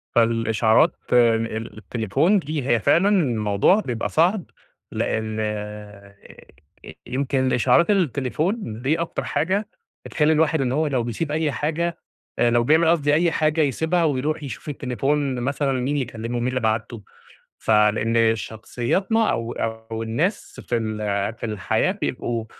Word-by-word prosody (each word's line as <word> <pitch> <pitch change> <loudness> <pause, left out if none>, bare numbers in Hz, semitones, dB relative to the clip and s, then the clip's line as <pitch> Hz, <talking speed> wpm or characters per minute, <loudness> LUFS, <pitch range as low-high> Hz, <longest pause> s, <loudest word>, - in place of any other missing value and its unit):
فالإشعارات 115 -1 +3 0.2
ال 115 -2 +1
التليفون 115 - +1
دي 150 -4 -4
هي 120 -3 +3
فعلًا 180 - +3
الموضوع 120 - +2
بيبقى 120 - -3
صعب 175 +4 +2 0.5
لأن 110 0 -2
آآ، 105 -1 -6 0.9
يمكن 130 0 0
الإشعارات 130 - +3
التليفون 150 - -1
دي 150 +6 0
أكتر 170 - -3
حاجة 190 +8 -1 0.4
بتخلّي 155 +1 +2
الواحد 160 -1 +2
إن 125 -1 0
هو 155 +3 +1
لو 130 -4 0
بيسيب 135 +6 -3
أي 155 -1 0
حاجة 160 +5 -2 0.4
آآ 120 - +4
لو 120 0 +3
بيعمل 160 +5 +4
قصدي 145 -3 +2
أي 165 +2 +3
حاجة 155 0 +1
يسيبها، 160 +5 +1
ويروح 150 +1 -1
يشوف 140 +3 -7
التليفون 135 +1 -1
مثلًا 135 +3 -1
مين 130 +3 -1
اللي 135 -3 0
كلمه 115 +1 -5
مين 120 - -1
اللي 130 0 -1
بعت 110 +1 -1
له، 110 - -8 0.6
فلإن 110 +1 +3
شخصيتنا 125 - -1
أو 115 +1 -3
أو 110 0 -4
الناس 150 - -2
في 120 - +1
ال 110 -1 -3 0.4
في 115 - -6
الحياة 110 - 0
بيبقوا 120 - -3
130 Hz, 140 wpm, -22 LUFS, 115-155 Hz, 0.9 s, آآ